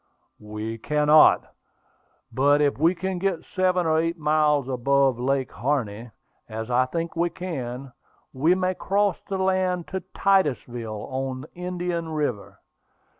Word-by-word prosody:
"We 105 +2 -6
cannot; 150 +4 +5 0.9
but 145 +2 +3
if 145 -2 +1
we 165 +4 +3
can 185 +1 -3
get 185 -3 -1
seven 185 -1 +2
or 160 0 +2
eight 165 +1 -1
miles 150 -3 +2
above 135 0 +2
Lake 135 +1 0
Harney, 120 -4 -2 0.4
as 110 +2 -5
I 125 +1 +3
think 165 +5 -4
we 170 +1 +1
can, 135 -7 -6 0.4
we 155 +7 +3
may 185 0 0
cross 200 0 0
the 195 - -1
land 185 -2 0
to 190 0 -3
Titusville, 120 - 0
on 130 0 -3
Indian 175 -2 -3
River. 145 -9 -3
150 Hz, 130 wpm, -24 LUFS, 130-180 Hz, 0.9 s, cannot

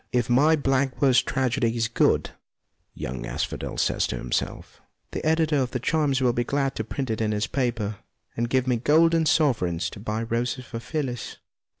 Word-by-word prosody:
" - - -46
If 120 -1 0
my 150 +6 +5
blank 135 -2 0
verse 130 -3 +5
tragedy 125 -3 0
is 115 0 +1
good," 115 - +2 0.6
young 60 0 -5
Asphodel - - -4
says - - +1
to - - -3
himself, - - -4
" - - -48
the - - -4
editor 160 -1 +2
of 130 -2 +1
the 125 - -3
Chimes 140 0 +1
will 125 -2 +3
be 120 - 0
glad 135 +1 0
to 110 - -1
print 130 +2 -4
it 110 - -2
in 110 -1 +1
his 105 0 0
paper, 115 -6 -2 0.4
and 120 0 -1
give 130 0 +2
me 125 -2 +1
golden 160 +5 +3
sovereigns 120 - +1
to - - -10
buy 110 +2 -3
roses 120 +3 -2
for 115 - -6
Phyllis." 125 -2 -4
125 Hz, 195 wpm, -25 LUFS, 115-140 Hz, 0.6 s, my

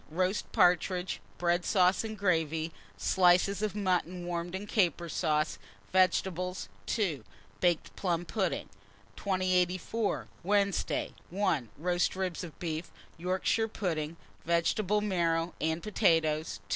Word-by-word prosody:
Roast 185 +5 -1
partridges, 180 +1 +2 0.2
bread 175 0 +1
sauce, 185 0 +3
and 220 -1 -5
gravy; 165 -4 +1 0.3
slices 180 - +3
of 215 -2 -1
mutton 180 -3 0
warmed 175 +1 -3
in 195 +2 -4
caper 180 -5 +1
sauce; 155 -1 0 0.3
vegetables. 185 -1 +1 0.2
2. 170 - 0 0.4
Baked 175 -2 +1
plum 175 -2 -1
pudding. 190 -2 -1 0.5
2084. 185 +2 0
Wednesday. 200 +1 +1 0.2
1. 170 - 0
Roast 175 +4 +1
ribs 185 -3 -2
of 165 -4 -9
beef, 165 -1 -4 0.3
Yorkshire 185 +5 +1
pudding, 165 -7 -3 0.3
vegetable 180 +5 +1
marrow, 170 -4 +1
and 160 +1 0
potatoes. 165 -7 +2
180 Hz, 110 wpm, -31 LUFS, 165-190 Hz, 0.5 s, sauce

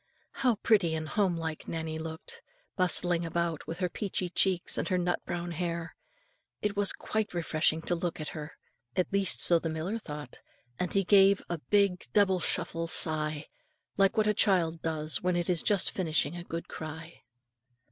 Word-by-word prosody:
How 250 -3 +1
pretty 200 -6 +2
and 155 0 -3
home 190 -5 +1
like 160 -1 -5
Nannie 160 -1 -4
looked, 160 0 -8 0.3
bustling 180 -2 +2
about 165 -1 -2
with 165 - -4
her 185 - 0
peachy 185 0 -3
cheeks 185 -1 +2
and - - -1
her 185 - +2
nut 175 0 -1
brown 175 0 -3
hair. 170 0 -3 0.6
It 210 0 -1
was 205 -1 +2
quite 215 -4 -3
refreshing 160 -1 +1
to 175 - -1
look 170 -1 -2
at 155 - -4
her, 150 0 -7 0.4
at 185 - 0
least 200 -1 +3
so 170 -1 +5
the 165 - -3
miller 165 +8 -3
thought; 150 - -8 0.4
and 180 - -1
he 195 - +2
gave 195 0 +5
a 170 - -2
big 200 +1 +1
double 195 -3 +4
shuffle 165 -1 -1
sigh, 155 -2 0 0.5
like 195 +1 +3
what 215 - +4
a 210 - +3
child 170 -6 +2
does 155 -1 -2
when 180 0 +1
it 175 +1 0
is 170 -3 +1
just 200 -4 +2
finishing 160 -3 0
a 175 - -6
good 165 -1 -5
cry. 160 +1 -8
175 Hz, 180 wpm, -30 LUFS, 160-190 Hz, 0.6 s, so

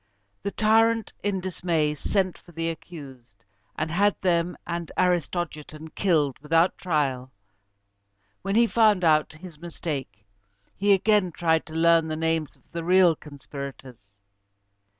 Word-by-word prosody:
The 200 - -2
tyrant, 225 +2 +2
in 200 -2 -1
dismay, 170 -4 -1
sent 185 +4 -1
for 175 - -18
the 165 +1 -2
accused, 135 - -11 0.3
and 155 +1 -2
had 200 +4 +2
them 175 -1 +1
and 170 -1 -4
Aristogiton 160 -3 -1
killed 155 -9 +1
without 165 +4 +2
trial. 135 -7 -1 1.1
When 195 +1 -2
he 235 +1 +6
found 215 -5 +3
out 155 -2 +3
his 160 -1 -12
mistake, 140 - -6 0.5
he 200 0 +3
again 200 -1 +2
tried 160 -1 0
to 160 - -10
learn 165 0 +4
the 155 - -3
names 160 -2 -1
of - - -31
the 170 0 -4
real 180 -1 +5
conspirators. 140 -5 -10
165 Hz, 130 wpm, -25 LUFS, 150-185 Hz, 1.1 s, he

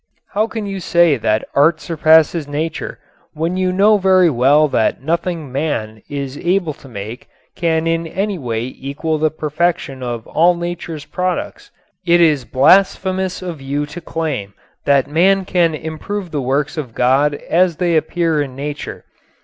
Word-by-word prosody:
How 215 +2 +1
can 220 -2 -5
you 195 -1 -4
say 170 -3 +3
that 110 -1 0
art 150 +4 +4
surpasses 160 -1 +3
nature 155 +2 -4 0.4
when 165 +3 -2
you 185 0 +1
know 205 +3 +4
very 185 -3 +4
well 140 +4 +4
that 115 +1 0
nothing 165 -2 -2
man 115 -7 -3
is 140 -1 -5
able 175 -3 0
to 140 - -16
make 110 +2 -8 0.3
can 165 -1 0
in 165 0 0
any 195 +2 -2
way 115 -4 -2
equal 140 +5 -4
the 155 0 +2
perfection 155 -3 -2
of 120 -2 -4
all 175 +2 +3
nature's 170 -3 -5
products? 180 +1 -3 0.3
It 175 -1 +4
is 150 -6 +3
blasphemous 185 +6 +2
of 170 -6 -6
you 140 +2 -2
to 150 +4 -9
claim 145 -13 -4 0.3
that 140 -2 +4
man 185 +5 +2
can 170 -4 +2
improve 165 +5 -5
the 145 - -2
works 140 +5 -1
of 130 -7 -5
God 135 +4 +3
as 175 +3 +1
they 175 0 0
appear 160 -1 +1
in 135 -3 -5
nature. 145 +2 -6
160 Hz, 155 wpm, -18 LUFS, 140-175 Hz, 0.4 s, art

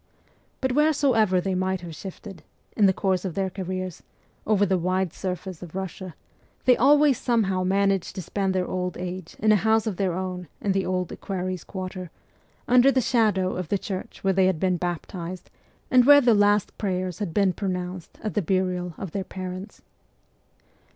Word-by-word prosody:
But 260 -1 +1
wheresoever 260 -9 +3
they 190 +1 -1
might 185 0 -1
have 175 - -8
been - - -8
shifted, 195 +2 -9 0.3
in 205 -3 +5
the - - +5
course 190 -1 0
of 185 -4 -4
their 190 -1 -1
careers, 185 -1 -5 0.5
over 205 -1 +3
the 190 -1 +1
wide 185 0 0
surface 185 -2 -5
of 175 -1 -10
Russia, 185 -2 -5 0.5
they 250 - +6
always 285 +1 +5
somehow 200 -7 +1
managed 195 0 +1
to 185 - -5
spend 195 +2 -1
their 185 -1 +1
old 180 -1 -3
age 180 -1 -6
in 215 0 +3
a - - +6
house 220 +3 +2
of 210 -5 -3
their 190 -3 0
own 180 -1 -4
in 200 - 0
the 190 0 0
Old 180 -1 -1
Equerries' 185 -2 -4
Quarter, 185 -2 -6 0.6
under 250 +2 +6
the 265 - +2
shadow 215 -7 +2
of 180 -2 -4
the 200 - +1
church 190 -1 -6
where 195 0 +3
they 190 0 +4
had 185 -4 0
been 185 0 +1
baptized, 175 +1 -5 0.4
and 250 -1 +7
where 285 +1 +9
the 245 -4 +4
last 205 -1 +3
prayers 185 -3 -2
had 205 -5 -3
been 195 +1 +2
pronounced 180 -2 -4
at 215 - -2
the 210 - +1
burial 180 -1 -1
of 190 -5 -6
their 195 +2 -2
parents. 185 +1 -7
190 Hz, 185 wpm, -25 LUFS, 180-205 Hz, 0.6 s, where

